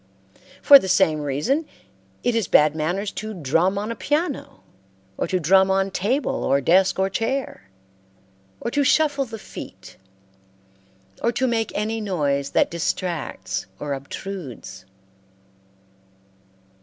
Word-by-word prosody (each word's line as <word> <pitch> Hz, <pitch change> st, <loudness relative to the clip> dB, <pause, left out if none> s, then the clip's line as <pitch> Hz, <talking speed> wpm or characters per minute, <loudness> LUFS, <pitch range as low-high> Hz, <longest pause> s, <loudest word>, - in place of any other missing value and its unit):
For 280 Hz, -1 st, +10 dB
the 190 Hz, -, -5 dB
same 165 Hz, -5 st, +3 dB
reason 150 Hz, -, -1 dB, 0.6 s
it 245 Hz, -, +1 dB
is 225 Hz, -6 st, 0 dB
bad 150 Hz, 0 st, +4 dB
manners 180 Hz, +6 st, -2 dB
to 215 Hz, 0 st, -6 dB
drum 165 Hz, +5 st, +1 dB
on 210 Hz, +3 st, -3 dB
a -, -, -4 dB
piano, 295 Hz, -, -2 dB, 0.5 s
or -, -, -2 dB
to 185 Hz, +1 st, 0 dB
drum 190 Hz, +4 st, +4 dB
on 195 Hz, 0 st, +1 dB
table 245 Hz, +11 st, -1 dB
or 140 Hz, -, +2 dB
desk 185 Hz, +7 st, +3 dB
or 190 Hz, 0 st, +2 dB
chair, 225 Hz, -, -3 dB, 0.9 s
or 235 Hz, -, -4 dB
to 285 Hz, -, +1 dB
shuffle 285 Hz, 0 st, +2 dB
the 225 Hz, -2 st, -8 dB
feet, -, -, -11 dB, 1.2 s
or 235 Hz, -, +2 dB
to 255 Hz, +2 st, 0 dB
make 230 Hz, -3 st, 0 dB
any 220 Hz, +2 st, -2 dB
noise 145 Hz, -9 st, -1 dB
that -, -, +2 dB
distracts 170 Hz, -1 st, -3 dB
or 145 Hz, -1 st, -3 dB
obtrudes. 135 Hz, -, -8 dB
190 Hz, 130 wpm, -23 LUFS, 155-230 Hz, 1.2 s, For